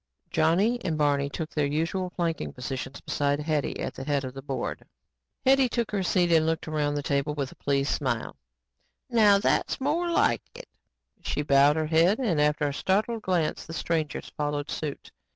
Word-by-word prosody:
Johnny 195 +10 +2
and 165 -4 -1
Barney 145 -2 +2
took 160 +2 -5
their 150 -2 0
usual 165 +5 -1
flanking 170 -2 -2
positions 130 +1 -6
beside 145 0 0
Hetty 150 -1 -1
at - - -3
the - - -7
head 140 0 0
of 130 - -6
the 135 - -8
board. 135 -1 -4 0.6
Hetty 265 -1 +5
took 235 -1 -2
her 205 -2 0
seat 180 -1 +2
and 160 -1 +4
looked 165 0 -1
around 150 -2 0
the 145 - -2
table 140 +1 0
with 140 -2 -3
a - - -14
pleased 140 0 0
smile. 125 -5 -2 0.8
"Now 210 -4 +6
that's 200 - +1
more 315 +6 0
like 335 - +2
it." - - -10 0.5
She 150 - -2
bowed 140 +1 +5
her 160 0 0
head 165 +6 +3
and, 190 - +1
after 150 0 +2
a 140 - -2
startled 215 +8 0
glance, 180 -5 -1
the 165 - -7
strangers 160 -1 -2
followed 145 0 -2
suit. 150 -3 -5
155 Hz, 185 wpm, -27 LUFS, 145-185 Hz, 0.8 s, Now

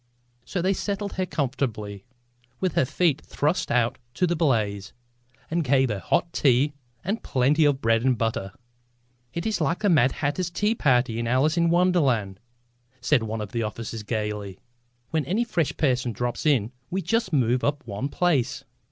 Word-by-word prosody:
So 180 - -3
they 190 +1 +3
settled 200 +1 -3
her 185 -1 -2
comfortably, 115 - -3 0.5
with 185 -4 0
her - - +3
feet 155 +1 +1
thrust 150 +5 -1
out 120 -1 +1 0.2
to 180 - +2
the 175 0 0
blaze, 105 - 0 0.6
and 170 0 +1
gave 135 -1 +3
her 105 -3 -2
hot 165 - 0
tea 140 +2 +3 0.3
and 205 +6 -2
plenty 140 +5 +2
of 140 -2 +2
bread 115 0 +3
and 130 -2 +2
butter. 110 -4 -2 0.8
"It 170 - -3
is 220 -5 -1
like 160 +3 +1
the 205 - +3
Mad 135 -7 +4
Hatter's 160 +5 -1
tea 210 +5 +1
party 125 - +2
in 115 - -2
Alice 135 +6 +2
in 170 -1 +3
Wonderland," 140 - +2 0.6
said 150 -5 +2
one 110 0 -3
of 105 - -6
the 115 - -1
officers 110 +1 -4
gaily. 105 -3 -3 0.5
"When 160 -2 +1
any 200 - +1
fresh 175 -10 -1
person 125 -5 +1
drops 120 +6 -2
in 120 -7 +2 0.2
we 190 +1 -2
just 225 -4 0
move 125 -4 +2
up 145 -2 -1
one 110 +5 -4
place." 155 -7 0
135 Hz, 170 wpm, -25 LUFS, 115-170 Hz, 0.8 s, Mad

